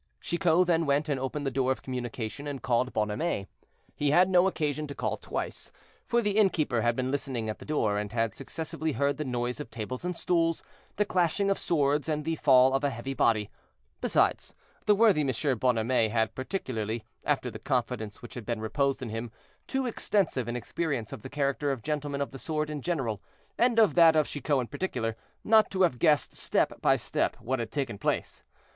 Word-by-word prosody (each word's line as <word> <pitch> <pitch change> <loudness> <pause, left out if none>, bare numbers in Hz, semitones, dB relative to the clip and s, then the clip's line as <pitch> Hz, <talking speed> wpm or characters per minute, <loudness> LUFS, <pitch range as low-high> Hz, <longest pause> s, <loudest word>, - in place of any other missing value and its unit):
Chicot 175 0 +2
then 165 -2 +2
went 145 +2 +2
and 140 -2 0
opened 135 +3 -3
the 135 - 0
door 130 0 +1
of 130 - -3
communication, 125 +1 -5
and 140 -4 -5
called 125 +1 +1
Bonhomet. 105 - -1 0.5
He 145 - +1
had 180 +5 +5
no 180 0 +5
occasion 150 -4 -1
to 140 - -7
call - - -1
twice, - - -5 0.4
for 235 0 +2
the 205 0 +1
innkeeper 155 - +2
had 120 0 +2
been 130 +1 -1
listening 130 -5 -2
at 110 - -4
the - - -10
door, 110 -9 +1
and 105 -1 -4
had 115 -1 0
successively 160 +2 -4
heard 140 0 +1
the 155 - -2
noise 125 -1 -2
of 150 - -6
tables 125 +4 -5
and 180 -1 -3
stools, 165 -2 +1 0.3
the 210 - +2
clashing 185 +3 +1
of 195 - 0
swords, 145 -2 +1
and 150 -1 -1
the 165 0 0
fall 130 -2 +5
of 135 +1 +1
a 145 - +3
heavy 135 +1 -5
body; 110 -5 +2 0.5
besides, - - +1 0.3
the 210 - +6
worthy 210 -7 +5
M. 135 -2 0
Bonhomet 115 -1 +2
had 110 0 0
particularly, 120 - -3 0.2
after 135 -4 0
the - - -8
confidence 125 -3 -2
which 120 - -9
had 120 - -6
been 115 0 -3
reposed 135 +5 0
in 120 - -4
him, 115 +2 -4 0.4
too 265 -1 -1
extensive 195 - 0
an 120 - -3
experience 130 -2 -3
of - - -7
the - - -8
character 140 0 0
of 130 -5 -4
gentlemen 145 -2 -2
of 140 - -2
the 135 - -9
sword 155 0 -2
in 150 -2 -4
general, 130 - -2 0.3
and 240 -1 +2
of 220 -3 +5
that 165 -2 +7
of 155 -1 +4
Chicot 145 -1 0
in - - -3
particular, 125 -6 -3 0.3
not 220 0 +5
to 190 -1 +1
have 130 -9 +2
guessed, 150 +2 +3
step - - 0
by - - +4
step, - - -1
what 130 +2 -2
had 115 -2 -3
taken 125 -6 -3
place. - - -2
140 Hz, 200 wpm, -28 LUFS, 120-160 Hz, 0.5 s, that